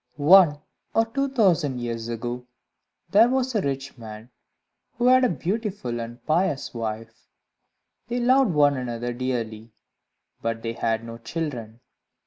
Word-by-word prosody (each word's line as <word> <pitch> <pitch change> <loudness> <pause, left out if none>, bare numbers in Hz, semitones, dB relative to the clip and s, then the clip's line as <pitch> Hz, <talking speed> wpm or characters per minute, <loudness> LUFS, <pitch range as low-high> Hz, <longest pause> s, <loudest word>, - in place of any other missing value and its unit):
One 155 0 +6 0.4
or 225 - +4
two 275 +5 -1
thousand 175 - +2
years 115 -1 -4
ago, 120 +1 -5 0.6
there 220 +4 +6
was 260 0 0
a 215 - +1
rich 135 -3 -4
man, 110 +1 -10 0.6
who 240 - -2
had 255 +1 +6
a 250 - +4
beautiful 185 - -3
and 115 +1 -8
pious 160 -2 0
wife; 115 -1 -6 0.8
they 240 +1 -2
loved 255 0 +4
one 145 -1 +4
another 120 -1 -3
dearly, 115 -3 -4 0.7
but 115 0 -3
they 115 0 -2
had 115 -1 -1
no 115 0 -8
children. 120 -4 -5
130 Hz, 135 wpm, -24 LUFS, -, 0.8 s, One